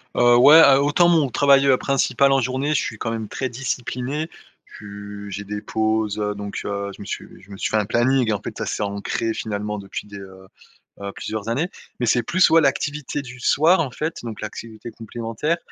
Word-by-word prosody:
Heu, 120 0 +5
ouais, 145 +6 +8
heu, 135 -2 +7
autant 160 +5 +3
mon 155 -6 +3
travail, 140 +1 +4
heu, 130 - +5
principal 135 0 +2
en 135 - +4
journée, 130 +4 -1
je - - +2
suis 110 - -5
quand 115 - -3
même 110 -1 -4
très 130 +5 -3
discipliné, 130 +4 -3 0.5
tu 100 0 -9
j'ai 100 +2 -5
des 105 +1 -5
pauses, 110 -1 -1
heu, 105 0 -1
donc 100 0 -5
heu, 100 0 -3
je - - -13
me - - -8
suis - - -5 0.2
je 100 - -17
me 95 - -8
suis - - -2
fait 110 - +1
un 105 - +1
planning, 120 +1 +2
en 105 - -2
fait, - - -7
ça - - -3
c'est - - -2
ancré, 100 +3 -2
finalement, 105 -1 -4
depuis 100 +1 -7
des, 100 -1 -10
heu 95 -1 -13 0.5
heu, 100 - -5
plusieurs 110 -1 -5
années 145 +10 -1 0.3
mais 125 - 0
c'est 120 +1 +2
plus 185 +9 +3
ouais, 165 0 +6
l'activité 145 0 -1
du 130 -2 -11
soir, 160 +8 +4
en 135 - -3
fait, 155 +5 -3
donc 110 -2 -7
l'activité 110 +2 -8
complémentaire 115 +8 -3
115 Hz, 215 wpm, -22 LUFS, 105-135 Hz, 0.5 s, ouais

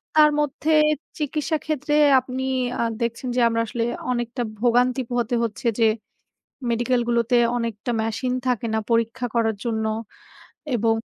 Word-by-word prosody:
তার 305 -1 +7
মধ্যে 295 +1 -1 0.5
চিকিৎসা 305 +1 -1
ক্ষেত্রে 295 -1 -1 0.3
আপনি 255 +1 -5 0.4
আ - - +2 0.2
দেখছেন 235 +2 -2
যে 250 - +2
আমরা 230 0 0
আসলে 230 +1 -2 0.3
অনেকটা 240 0 -2 0.2
ভোগান্তি 245 +2 +3
পোহাতে 240 -1 0
হচ্ছে 230 +1 -3
যে, 225 - +5 0.8
মেডিকেল 240 +1 +1
গুলোতে 235 +1 +2 0.2
অনেকটা 230 0 -3
মেশিন 225 +3 -1
থাকে 240 -2 0
না - - +2
পরীক্ষা 230 +2 +1
করার 225 -2 +2
জন্য 220 -2 -1 0.9
এবং 225 0 +2
240 Hz, 135 wpm, -23 LUFS, 230-255 Hz, 0.9 s, তার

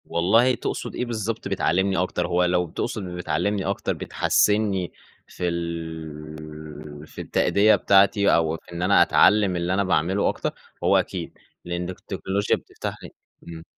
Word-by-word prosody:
والله 115 +9 +3
تقصد - - -4
إيه 125 - -2
بالضبط 115 -2 -3
بتعلّمني 95 0 +1
أكتر؟ 90 0 -1
هو 90 +1 +2
لو 90 -1 +1
تقصد 100 +5 -3
بتعلّمني 90 +2 -2
أكتر 100 0 -1
بتحَسّنّي 105 -5 +1 0.4
في 90 - -4
ال 75 -2 -7
في - - -9
التأدية 105 +2 +3
بتاعتي، 100 +1 +4
أو 80 -1 +1
في - - -19
إن 85 - -5
أنا 95 +2 +4
أتعلّم 105 -3 +4
اللي 85 +1 -1
أنا 100 +1 +2
باعمله 95 +1 +1
أكتر، - - -3 0.3
هو - - +4
أكيد. - - -3 0.3
لإن 85 0 -3
التكنولوجيا 95 +2 -2
بتفتح - - -7
لي - - -8 0.4
إمم. 80 -1 -9
90 Hz, 145 wpm, -24 LUFS, 80-100 Hz, 0.4 s, بتاعتي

